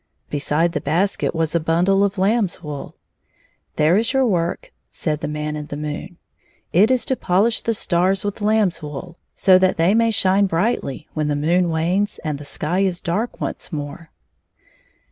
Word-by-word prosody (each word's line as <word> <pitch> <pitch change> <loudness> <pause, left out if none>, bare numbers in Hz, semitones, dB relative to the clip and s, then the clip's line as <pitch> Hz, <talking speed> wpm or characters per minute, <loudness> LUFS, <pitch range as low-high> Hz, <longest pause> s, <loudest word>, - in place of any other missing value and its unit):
Beside 150 +3 +1
the - - -3
basket 175 +5 0
was 160 -1 -1
a 170 - +3
bundle 175 +5 +2
of 200 0 0
lamb's 195 -1 +1
wool. 150 -2 -7 0.4
" - - -40
There 155 +5 +3
is 230 +4 +1
your 265 -1 +3
work," 175 -6 -1 0.2
said 150 -2 -2
the - - -2
Man 150 0 -3
in 150 -1 -6
the 145 - -6
moon. 150 +4 -6 0.6
*^It 200 +6 +5
is 255 -1 +2
to 260 - 0
polish 210 +3 +1
the 230 - 0
stars 185 +1 +1
with 205 - -2
lamb^s 210 -4 +1
wool, 155 +4 -8 0.2
so 185 -2 +5
that 185 0 +2
they 170 +4 +3
may 230 +1 +3
shine 200 -2 +3
brightly 165 - -1
when 155 -1 -1
the 145 - 0
moon 170 +4 +2
wanes 180 +6 0
and 150 -3 -3
the 145 - -9
sky 155 +5 -1
is 190 -3 +1
dark 195 +7 -2
once - - -5
more." 150 +1 -6
175 Hz, 185 wpm, -21 LUFS, 155-200 Hz, 0.6 s, ^It